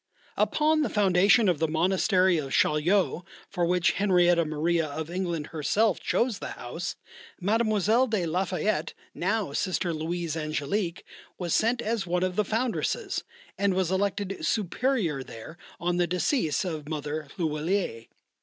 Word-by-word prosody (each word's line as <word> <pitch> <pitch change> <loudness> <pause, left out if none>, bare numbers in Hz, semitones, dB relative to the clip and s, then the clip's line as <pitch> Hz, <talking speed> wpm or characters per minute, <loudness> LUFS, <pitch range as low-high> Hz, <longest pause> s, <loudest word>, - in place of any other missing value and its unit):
Upon 310 +1 +2
the 295 - 0
foundation 200 +2 +4
of 175 -5 +2
the 160 - +2
monastery 180 +2 +2
of 135 -3 -5
Chaillot, 175 +4 +2 0.3
for 175 -1 0
which 180 -1 +3
Henrietta 175 -3 +3
Maria 160 +2 0
of 155 +3 -5
England 170 -4 -3
herself 195 +6 +1
chose 235 -4 0
the - - -5
house, 145 +9 -5 0.4
Mlle. 215 +4 +2
de 215 -6 0
la 175 +4 0
Fayette, 180 -3 -1 0.2
now 200 -4 -1
Sister 180 0 -1
Louise 165 +1 -3
Angélique, 160 +4 -2 0.3
was 175 -3 -2
sent 235 +2 +2
as 220 -3 -1
one 180 +1 0
of 185 -1 -1
the 210 - +2
foundresses, 255 - -1 0.4
and 200 -2 +2
was 185 -2 0
elected 195 0 -1
Superior 210 - 0
there 125 +5 -10 0.2
on 175 0 0
the 175 -1 +2
decease 180 - 0
of 155 -4 -5
Mother 150 -1 -4
L'huillier. 155 - -1
180 Hz, 145 wpm, -27 LUFS, 160-205 Hz, 0.4 s, foundation